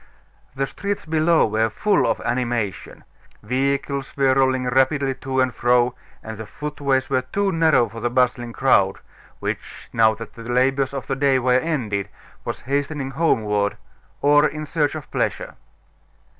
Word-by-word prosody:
The 135 0 0
streets 200 +7 -4
below 160 +1 +3
were 110 +1 +1
full 205 - +1
of - - 0
animation; 120 -6 -2 0.4
vehicles 140 +4 -1
were 135 -1 +4
rolling 130 -1 +2
rapidly 135 +2 +2
to 130 0 -3
and 130 -1 +2
fro, 120 +1 +2 0.3
and 110 -1 -7
the 110 - -7
footways 140 -1 -2
were 130 -1 +2
too 195 +10 -1
narrow 160 -8 +3
for 115 - -9
the 120 - -1
bustling 125 -1 +1
crowd, 100 -7 +3 0.4
which, - - -6
now 110 -1 +4
that 115 - -9
the 115 - -11
labors 135 +2 +1
of 135 -4 -4
the 135 - -2
day 135 0 +3
were 125 0 +3
ended, 115 -11 -2 0.3
was - - -5
hastening 140 0 -2
homeward 105 -10 +1 0.5
or 145 +1 +5
in 155 0 -6
search 150 0 0
of 155 - -8
pleasure. - - -2
130 Hz, 155 wpm, -22 LUFS, 120-145 Hz, 0.5 s, or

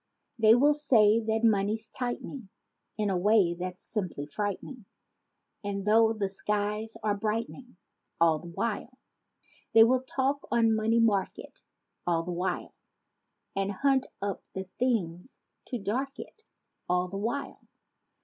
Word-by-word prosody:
They 220 0 +7
will 290 +4 +5
say 230 -7 +4
that 220 0 -1
"money's 215 0 +2
tightening 245 -2 -5 0.5
In 210 -2 0
a 185 - +1
way 200 -2 +4
that's 180 +1 -6
simply 180 -9 -3
frightening!" 205 - -5 0.8
E'en 200 -1 -3
though 220 +2 +5
the 210 -3 -1
skies 210 +3 -2
are 210 -1 +2
brightening— 225 +3 -4 0.4
All 165 -2 +4
the 175 - -11
while. 230 +7 -3 0.8
They 225 - +10
will 250 +2 +3
talk 270 +2 -1
on 230 -2 +3
"money 220 +2 +2
market" 205 -5 0 0.5
All 165 -1 +2
the 180 - -5
while. 180 +2 -3 0.8
And 195 0 0
hunt 270 +4 +2 0.2
up 200 -1 -2
the 190 - -3 0.2
things 205 -5 -1 0.3
to 250 - -3
dark 260 +7 -3
it 440 - -11 0.4
All 180 0 +2
the 195 +2 -6
while. 235 +7 -3
215 Hz, 135 wpm, -29 LUFS, 195-235 Hz, 0.8 s, They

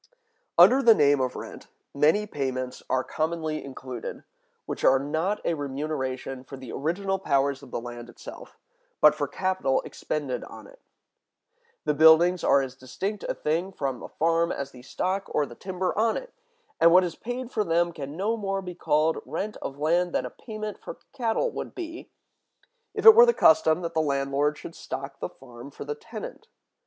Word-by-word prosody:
Under 210 +11 +8
the 230 -4 +7
name 145 -4 +4
of 125 -1 -1
rent, - - -9 0.3
many 155 +9 +3
payments 130 -7 -4
are 130 0 +1
commonly 155 0 -2
included, 130 -3 -7 0.4
which - - -5
are 135 - +6
not 160 +9 -1
a - - +1
remuneration 135 -3 -4
for 135 +1 -10
the 130 -3 -9
original 195 +6 -1
powers 140 -5 +1
of 140 - -13
the - - -3
land 120 0 -8
itself, - - -11 0.4
but - - +7
for - - -2
capital 185 -8 0
expended 145 -4 -4
on - - -11
it. - - -16 1.1
The 150 - +2
buildings 160 +3 +6
are 140 - +4
as 130 -1 -6
distinct 190 - -5
a - - -1
thing 165 +5 -1
from 135 -8 -3
the - - -9
farm 165 +1 +1
as 140 0 -4
the 125 - -13
stock 185 +9 -2
or 150 - +3
the 125 - -11
timber 185 +6 -3
on 225 +2 +2
it; - - -8 0.5
and 170 - +6
what 185 +2 +7
is 175 -2 -2
paid 245 +4 -6
for 215 - 0
them 170 -1 +1
can 145 -1 -7
no 210 +5 0
more 195 -3 -3
be 180 -1 -6
called 160 -1 +1
rent 210 +1 -4
of 135 - -6
land 170 +4 +1
than 130 - 0
a 125 - -6
payment 215 -2 -7
for - - -8 0.2
cattle 260 - 0
would - - -6
be, 340 -1 -7 0.9
if - - -3
it 445 - +13
were 475 +2 +8
the 475 - +4
custom 160 +2 +4
that 170 0 -3
the 160 - +2
landlord 140 0 0
should 165 - -9
stock 135 -2 -7
the - - -3
farm 125 0 -12
for 140 - -9
the 145 - -2
tenant. 220 +8 -9
160 Hz, 185 wpm, -26 LUFS, 135-195 Hz, 1.1 s, it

